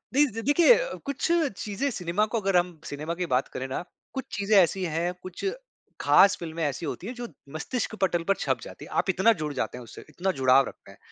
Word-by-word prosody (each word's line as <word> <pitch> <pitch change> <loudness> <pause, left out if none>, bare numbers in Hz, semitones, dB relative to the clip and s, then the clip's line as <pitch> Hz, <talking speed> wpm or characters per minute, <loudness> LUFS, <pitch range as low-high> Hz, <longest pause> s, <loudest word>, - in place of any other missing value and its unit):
जी 295 +1 +6 0.2
देखिए, 320 - +6 0.3
कुछ 280 -2 -2 0.4
चीज़ें 215 +7 -1
सिनेमा 185 +1 0
को 230 - +1
अगर 195 -2 +2
हम 175 -2 0
सिनेमा 150 +4 -4
की 180 0 -2
बात 130 - +2
करें 130 +1 -5
ना, 135 +6 -3 0.3
कुछ 265 -1 -4
चीज़ें 205 +1 +2
ऐसी 185 +1 +4
हैं, 170 +2 -1
कुछ 185 -1 -8 0.6
ख़ास 200 +1 +6
फ़िल्में 165 -1 -4
ऐसी 150 +3 -2
होती 190 - -5
हैं 250 - -4
जो 240 0 -5 0.3
मस्तिष्क 220 +7 -3
पटल 175 -3 +2
पर 195 - +5
छप - - 0
जाती - - -10
हैं। - - -14
आप - - -7
इतना 190 +5 +4
जुड़ 150 -1 -2
जाते 130 - -3
हैं 125 - -8
उससे, 115 - -11
इतना 190 +2 -1
जुड़ाव 130 +1 +5
रखते - - -12
हैं। - - -17
180 Hz, 215 wpm, -27 LUFS, 160-215 Hz, 0.6 s, जी